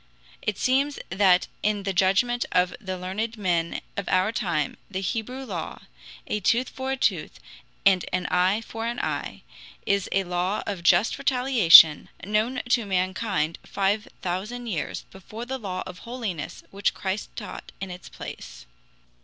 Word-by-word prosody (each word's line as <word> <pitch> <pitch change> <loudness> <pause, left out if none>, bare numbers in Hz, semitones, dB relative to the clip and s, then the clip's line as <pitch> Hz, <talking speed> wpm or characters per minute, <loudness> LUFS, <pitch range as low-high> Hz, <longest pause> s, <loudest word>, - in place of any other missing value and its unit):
It 210 -3 -2
seems 275 +3 +1
that 185 -1 +4 0.2
in 210 -1 0
the 195 0 -1
judgment 195 +7 +2
of 180 0 +2
the 185 -2 -4
learned 210 +6 -3
men 175 -5 0
of 200 - -3
our 185 +3 +3
time 170 -10 -1
the 190 -2 -3
Hebrew 240 +7 -3
law 175 -9 -5 0.4
a 210 - -1
tooth 235 +6 +2
for 265 0 -4
a - - -3
tooth, - - 0 0.5
and 190 -3 +5
an 185 0 -1
eye 185 +4 +3
for 225 0 -5
an 240 +1 -3
eye - - -3 0.4
is 200 -1 +1
a 195 - +2
law 180 +3 -1
of 200 -4 -4
just 175 +5 +3
retaliation, 230 - +7 0.2
known 215 +5 0
to 240 -1 +3
mankind 185 -3 -1
five 200 +2 0 0.2
thousand 210 +7 -3
years 185 -10 -3
before 215 +5 -8
the 265 +1 -4
law 185 -4 -4
of 180 0 -9
holiness 230 -10 -5
which 200 0 0
Christ 195 +2 -3
taught - - -8
in 190 -1 -5
its 180 0 -9
place. - - -9
195 Hz, 155 wpm, -25 LUFS, 180-230 Hz, 0.5 s, retaliation